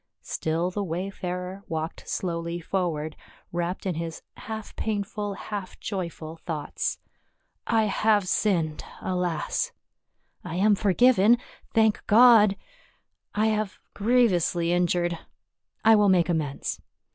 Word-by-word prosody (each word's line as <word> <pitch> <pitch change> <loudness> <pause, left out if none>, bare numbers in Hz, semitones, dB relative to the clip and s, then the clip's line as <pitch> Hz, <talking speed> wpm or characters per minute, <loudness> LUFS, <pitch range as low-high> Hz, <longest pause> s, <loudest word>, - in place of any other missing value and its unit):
Still 165 +3 -1
the 205 +2 -2
wayfarer 180 +1 -4
walked 160 0 -4
slowly 170 -1 -2
forward, 165 -4 -2 0.4
wrapped 175 +2 -3
in 185 - 0
his 165 0 -5
half 220 -1 -7
painful, 205 -1 -2
half 200 -2 -6
joyful 170 -5 -5
thoughts. 160 -3 -3 0.4
" - - -48
I 225 -1 +3
have 210 -1 +2
sinned, 170 -7 +1 0.2
alas! 180 -3 -1 0.3
— - - -53 0.3
I 175 -1 -5
am 205 +4 +4
forgiven, 220 +3 +5 0.4
thank 220 -1 +3
God! 215 -3 +7 0.8
I 215 +1 +2
have 215 -2 -2 0.2
grievously 190 -7 +2
injured 175 -1 +1 0.3
— - - -41
I 225 0 +8
will 205 -1 +4
make 180 -2 +4
amends. 155 -5 -2
185 Hz, 120 wpm, -26 LUFS, 170-210 Hz, 0.8 s, I